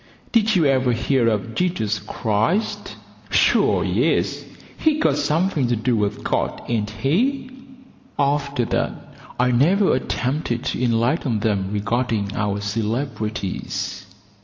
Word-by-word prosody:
"Did 220 -2 +3
you 170 -4 +3
ever 130 -3 +3
hear 120 +1 +1
of 115 0 -1
Jesus 110 - 0
Christ?" 110 - -1 0.3
"Sure, - - +3
yes; - - +1 0.3
he's 310 -1 +1
got 150 - +3
something 150 -1 +1
to 120 - +1
do 115 +2 0
with 105 -1 -1
God, - - -1
ain't 110 -3 -1
he?" 235 - 0 0.7
After 140 -3 0
that - - -1 0.5
I 125 0 +3
never 175 - +3
attempted 130 -1 -2
to - - -2
enlighten 120 0 +1
them 100 -3 0
regarding 110 -1 -1
our 105 -1 -1
celebrities. 110 -2 -3
120 Hz, 120 wpm, -22 LUFS, 110-145 Hz, 0.7 s, Did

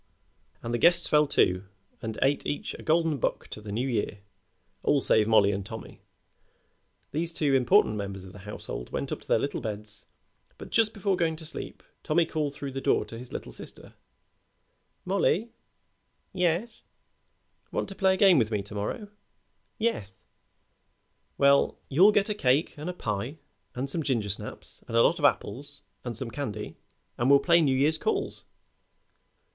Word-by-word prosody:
And 115 - -3
the 120 - 0
guests 170 0 +5
fell 150 0 +4
to 90 -7 +2 0.4
and 110 -1 -5
ate 140 +2 +2
each 145 - -3
a - - -9
golden 160 -2 +1
buck - - -1
to 105 - -8
the 105 -1 -7
New 120 +6 -1
Year 105 -4 -2 0.6
all 145 - +3
save 110 -4 +3
Mollie 105 -3 +5
and 100 0 -3
Tommy. 110 +2 -9 1.1
These 165 +3 -1
two 150 -4 0
important 130 - +4
members 100 -2 -5
of 95 -1 -12
the 105 - -11
household 95 -10 -7
went - - -3
up - - -4
to - - -18
their - - +4
little 140 - -2
beds, 105 -2 -7 0.5
but - - -10
just 225 -1 +2
before 200 -1 +1
going 165 -2 0
to 160 0 -6
sleep 155 - -5 0.2
Tommy 165 +2 +2
called 150 -3 -2
through 140 -1 -5
the 135 +1 -4
door - - +2
to 115 - -9
his 125 0 -11
little - - -6
sister: - - -12 1.1
"Mollie!" 200 +4 +1 0.8
"Yeth!" 180 +5 0 0.9
"Want - - -2
to - - -6
play 190 -1 +3
a - - -5
game 185 -6 +6
with 110 -3 +1
me 105 -3 -1
to 100 - -11
morrow?" 105 - -4 0.7
"Yeth!" 220 - -1 1.3
"Well, 140 0 +4
you 185 +10 +6
get 205 -1 +2
a 210 - 0
cake 140 -5 +2
and 150 +3 -5
a - - -3
pie 115 - -3 0.4
and 130 +2 -2
some 160 +4 -2
gingersnaps 110 -8 -3
and 115 - -1
a 115 - +7
lot 170 - +3
of 145 - +2
apples 145 0 0 0.2
and 120 -3 -4
some 120 -1 -4
candy 110 -7 -5 0.4
and 120 +2 +2
we'll 140 - +8
play 170 +4 +4
New 135 -4 +2
Year's 150 +4 +2
calls." 410 -2 -2
140 Hz, 175 wpm, -28 LUFS, 110-170 Hz, 1.3 s, we'll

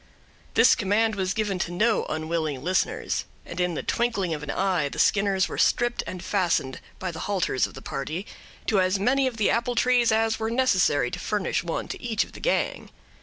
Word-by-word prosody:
This 230 +1 +7
command 220 +2 +1
was 190 -1 -1
given 210 -4 -1
to 175 - -2
no 215 +5 +2
unwilling 155 -3 -2
listeners; 185 +3 0 0.2
and 170 - -7
in 180 -1 0
the - - -3
twinkling 205 -8 0
of 150 - -4
an 150 - -7
eye 180 -4 0
the - - -9
Skinners 195 -2 +2
were - - -5
stripped 240 0 +2
and 185 -1 -6
fastened, 175 -10 0 0.2
by 185 -1 -4
the 160 - -8
halters 185 -9 +1
of - - -14
the 135 - -10
party, 155 +8 -4 0.4
to 200 -4 +3
as 185 +2 +2
many 260 +7 +2
of 245 -3 -4
the 215 - +2
apple 240 +1 0
trees 245 -1 +3
as 225 0 +1
were 220 0 -1
necessary 190 - +2
to - - -5
furnish 210 -4 -1
one 170 -1 -3
to - - -6
each 230 -3 0
of - - -13
the - - -11
gang. - - -1
195 Hz, 205 wpm, -25 LUFS, 170-225 Hz, 0.4 s, This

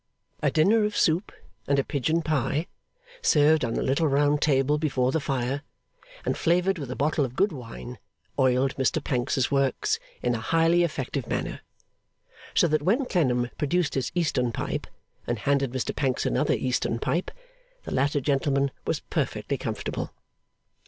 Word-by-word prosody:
A - - +3
dinner 210 +8 +4
of 210 0 -1
soup 165 +5 +2 0.4
and 140 - +2
a 140 - +3
pigeon 155 +5 0
pie, 150 +1 0 0.6
served 155 - +4
on 115 -2 -1
a - - 0
little 140 +5 +2
round 145 +1 +2
table 145 0 +2
before 130 -4 +1
the 160 - +1
fire, 135 -1 -1 0.6
and - - 0
flavoured 180 +2 +2
with 140 -4 -5
a 130 - -4
bottle 150 +1 +1
of 130 -2 -4
good 195 +5 +2
wine, 125 -3 -8 0.4
oiled 130 0 +3
Mr 135 +4 +1
Pancks's 130 0 0
works 135 -1 +1 0.2
in 125 - +2
a 115 - -2
highly 165 +7 +3
effective 140 -5 -2
manner; - - -3 0.9
so - - +5
that 155 -1 +1
when 225 - +2
Clennam 125 - +1
produced 165 +2 +1
his 135 -2 -1
Eastern 140 -8 +1
pipe, - - -3 0.4
and 120 - 0
handed 135 +2 +1
Mr 130 -2 -2
Pancks 135 -3 0
another - - +2
Eastern 125 -2 -1
pipe, 170 +9 -1 0.5
the - - -7
latter 140 +2 +2
gentleman 140 0 +1 0.2
was - - 0
perfectly - - -2
comfortable. - - -4
140 Hz, 160 wpm, -26 LUFS, 130-160 Hz, 0.9 s, so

